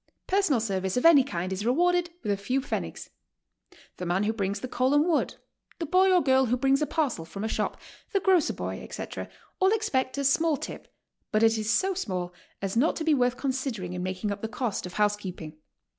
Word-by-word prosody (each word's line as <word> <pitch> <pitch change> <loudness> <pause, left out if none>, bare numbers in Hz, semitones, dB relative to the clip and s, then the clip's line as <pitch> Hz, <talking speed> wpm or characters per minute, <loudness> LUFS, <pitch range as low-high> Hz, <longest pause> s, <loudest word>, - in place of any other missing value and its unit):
Personal 380 -10 +2
service 190 -2 -1
of 250 - 0
any 315 -5 +8
kind 185 -8 -3
is 190 +2 -4
rewarded 350 +8 +2
with 210 - 0
a - - +2
few 250 +7 -1
pfennigs. 270 - -5 0.9
The 180 - -5
man 180 +3 +1
who 215 +2 +1
brings 200 -1 -2
the - - -4
coal 255 +3 +1
and 295 +2 +4
wood, 330 -3 +1 0.4
the 335 - -3
boy 375 +4 +4
or 360 -2 +4
girl 265 -1 +4
who 245 +2 +1
brings 270 +3 +2
a 300 - +1
parcel 280 - -1
from 195 +5 -7
a - - 0
shop, - - -2 0.3
the 400 - +2
grocer 375 -4 +3
boy, - - -4
etc., - - -6 0.3
all 380 0 +4
expect 290 -13 0
a 280 - -1
small 310 +2 +3
tip, - - -8 0.4
but 215 +1 +2
it 225 0 +5
is 215 -1 -2
so 380 +11 +2
small 185 - -3 0.3
as 195 +1 -2
not 270 +8 +3
to 320 - -3
be 315 -1 +3
worth 250 -2 +2
considering 260 -9 -3
in 180 - -4
making 185 +3 -3
up 200 0 -5
the 220 - -2
cost 220 -3 -3
of 180 - -11
housekeeping. 195 -7 -2
250 Hz, 215 wpm, -27 LUFS, 200-305 Hz, 0.9 s, any